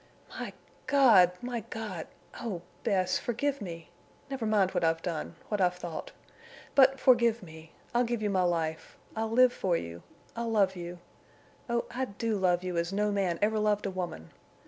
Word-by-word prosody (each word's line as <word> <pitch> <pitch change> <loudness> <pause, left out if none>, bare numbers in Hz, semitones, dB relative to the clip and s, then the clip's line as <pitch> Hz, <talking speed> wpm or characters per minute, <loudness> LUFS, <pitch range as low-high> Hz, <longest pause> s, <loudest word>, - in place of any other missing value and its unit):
"My - - -6 0.3
God!... 225 -11 +6
My 245 -1 -2
God!... 210 -6 -6 0.3
Oh, 195 -8 -4 0.2
Bess!... 190 -4 +1
Forgive 275 +4 -1
me! 165 -4 -7 0.4
Never 255 -5 -2
mind 200 -3 +3
what 180 -2 -1
I've 165 0 +1
done—what 175 +4 -4
I've 180 -1 +3
thought. 175 -2 -6 0.6
But 270 -1 +6
forgive 235 -3 +4
me. 160 -1 -12 0.2
I'll 240 +1 +3
give 235 -2 -2
you 205 - +1
my 190 -2 +2
life. 165 -3 -1 0.2
I'll 220 0 -1
live 250 +2 +5
for 180 -3 0
you. 85 - -7 0.3
I'll 230 0 -2
love 200 -4 +3
you. 175 0 -6 0.7
Oh, 235 0 0
I 260 +1 -1
do 225 0 -2
love 180 -1 +2
you 180 -2 -3
as 170 +1 0
no 210 +1 +1
man 190 -4 0
ever 215 +1 +2
loved 210 -1 +1
a 195 - -1
woman. 175 - -5
200 Hz, 170 wpm, -30 LUFS, 175-230 Hz, 0.7 s, God